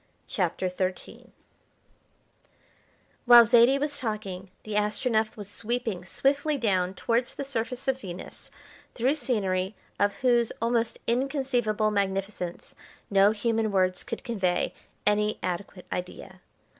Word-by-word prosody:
CHAPTER 185 -1 -1
XIII 185 0 -4 2.0
While 240 -1 +9
Zaidie 240 +3 +6
was 290 0 -2
talking 200 -5 -4
the 215 - -6
Astronef 215 +2 0
was 205 -2 -7
sweeping 225 -3 -3
swiftly 285 - +1
down 190 -6 0
towards 235 +5 0
the - - -4
surface 250 0 -4
of 265 0 0
Venus, 180 -2 -8 0.5
through 255 +4 +2
scenery 205 -8 -1 0.2
of 205 +1 +3
whose 240 -2 +4
almost 230 0 0
inconceivable 245 -4 0
magnificence 195 -3 -2 0.4
no 195 0 +6
human 220 0 0
words 185 -2 +1
could - - -6
convey 195 -8 0 0.3
any 210 +1 +2
adequate 180 +1 -4
idea. 180 0 -6
215 Hz, 115 wpm, -27 LUFS, 190-240 Hz, 2.0 s, While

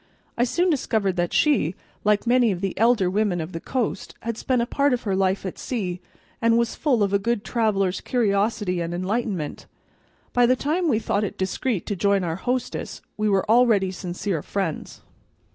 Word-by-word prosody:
I 240 - +2
soon 350 +8 +1
discovered 215 - 0
that 175 0 0
she, 230 - +2 0.3
like 210 +1 +2
many 240 -2 +4
of 180 - -3
the 195 -2 -2
elder 225 -3 +3
women 195 -1 +1
of 160 +2 -5
the 165 - -5
coast, 235 -1 -3
had 230 0 -3
spent 255 +2 0
a 235 - +1
part 280 +2 +1
of 245 - -1
her 200 -4 0
life 190 0 +1
at 185 - -5
sea, 185 -8 -3 0.4
and 230 0 +4
was 235 -1 +1
full 255 -9 +1
of 200 0 0
a 200 - +4
good 230 +1 -1
traveler's 200 -5 0
curiosity 205 -5 0
and 170 +1 -3
enlightenment. 190 -4 -3 0.7
By 245 -1 +4
the 255 - +4
time 320 +6 0
we 230 - +3
thought 210 -2 0
it 205 - -4
discreet 190 +2 -1
to 205 - -2
join 200 +1 +2
our 165 -1 -2
hostess 250 +5 -3
we 215 0 0
were 195 -2 +1
already 220 -5 +4
sincere 180 -1 -3
friends. 190 -3 -4
210 Hz, 190 wpm, -24 LUFS, 190-240 Hz, 0.7 s, many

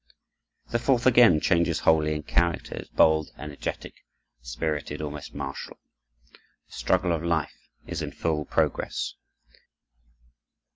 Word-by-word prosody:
The 120 - +1
fourth 120 0 +1
again 120 -10 +7
changes 85 0 +1
wholly 75 -1 +3
in 75 - -4
character; 85 +2 0
is - - -8
bold, 80 -1 +3
energetic, 75 +1 -6 0.5
spirited, 75 +4 -3
almost 75 -1 -6
martial. 70 - -6 0.6
The - - -25
struggle 90 -1 +1
of 80 -2 0
life 85 -3 0 0.3
is - - -4
in - - -4
full 75 -2 -2
progress. - - -1
80 Hz, 115 wpm, -26 LUFS, 75-85 Hz, 0.6 s, again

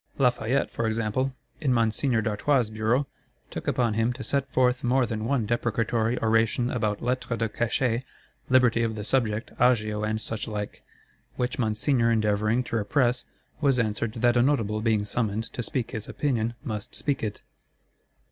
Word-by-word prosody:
Lafayette, 125 0 +1
for 115 - -1
example, 115 +4 0 0.3
in 145 -5 +1
Monseigneur 115 0 +1
d'Artois' 115 +2 +1
Bureau, 110 +6 +1 0.5
took - - -6
upon 125 -5 +1
him 115 +2 +1
to 130 +1 -7
set 140 -1 0
forth 125 -1 +2
more 125 +1 +3
than 110 -1 -3
one 125 -2 +1
deprecatory 115 +1 0
oration 115 +2 +2
about 105 -4 -1
Lettres 125 -1 -1
de 115 0 0
Cachet, 120 +2 0 0.5
Liberty 125 -3 +4
of 115 -1 0
the 105 - -5
Subject, 115 -2 0
Agio, 110 -4 +2
and 110 0 0
suchlike; 110 -2 -4 0.5
which 125 +1 -2
Monseigneur 115 +2 +2
endeavouring 110 +1 +2
to 115 - -2
repress, 125 +3 +1 0.4
was 140 -3 +3
answered 110 -1 -1
that 120 0 +2
a - - +5
Notable 115 -6 +1
being 110 -2 +1
summoned 110 0 -1
to - - -3
speak 120 0 -2
his 110 -3 -6
opinion 120 -5 -1
must 105 -3 -5
speak 140 -2 -1
it. 105 -2 -4
115 Hz, 155 wpm, -26 LUFS, 110-125 Hz, 0.5 s, a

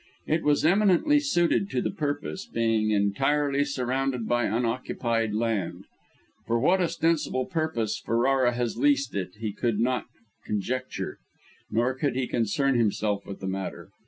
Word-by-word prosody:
It 160 +1 +1
was 150 0 +2
eminently 200 - +4
suited 195 - +1
to - - -1
the - - -1
purpose, 150 +2 -3
being 115 -2 +1
entirely 135 +8 +2
surrounded 130 -2 -1
by 120 0 +2
unoccupied 115 -1 -1
land. 110 -5 -1 0.6
For 115 - +2
what 180 +9 +3
ostensible 165 -6 0
purpose 155 - -1
Ferrara 120 +2 +2
has 120 -2 -2
leased 140 +1 +2
it, 95 -2 -4
he 110 -2 -2
could 115 -2 -1
not 125 +2 0 0.4
conjecture, 125 +5 -3 0.5
nor 120 +3 +1
did 130 -1 -1
he 130 0 0
concern 120 +5 +1
himself 105 -2 0
with 100 - -8
the 95 - -4
matter. 95 0 -5
125 Hz, 140 wpm, -27 LUFS, 115-145 Hz, 0.6 s, eminently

